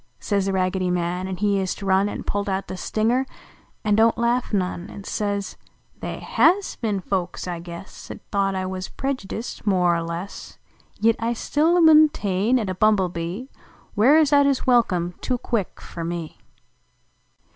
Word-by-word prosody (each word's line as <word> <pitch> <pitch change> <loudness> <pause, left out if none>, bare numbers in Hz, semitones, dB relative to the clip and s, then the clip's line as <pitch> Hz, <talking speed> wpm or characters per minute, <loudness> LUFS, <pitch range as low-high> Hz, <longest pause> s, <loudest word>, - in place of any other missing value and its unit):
Says 200 -2 0
The - - +1
Raggedy 185 0 0
Man: 180 +1 -1
an 190 -1 -4
lie 200 -1 +2
ist 190 +2 -3
run 195 +1 +2
An - - -5
pullt 205 0 -2
out 190 0 -2
the - - -5
stinger, 230 +7 0 0.6
an 210 -2 +2
don 225 +1 +6
t - - -9
laugh 240 +1 +1
none, 185 -2 -2
An 200 - -9
says: 200 -1 -3 0.2
" - - -37
They - - -5
Jias 385 +4 +3
ben 210 -4 -1
folks, 185 -1 -3
I 175 -1 -4
guess, 170 +2 -10
At - - -7
thought 195 -1 +1
T 190 0 -2
wuz 185 0 -5
predjudust. 245 -5 -5
more 180 -3 +3
er - - -2
less, 170 +4 -6 0.4
Yit 225 +1 +3
T 230 +1 0
still 320 +9 +2
muntain 260 - +4
at 215 - -2
a 185 - -2
Bumblebee 185 0 0 0.5
"Wears 290 +7 +5
out 285 0 +6
his 275 -2 0
welcome 185 -9 +2
too 255 - -1
quick 230 -5 -3
fer 170 - -7
me 170 -1 -5
200 Hz, 170 wpm, -23 LUFS, 185-235 Hz, 0.6 s, don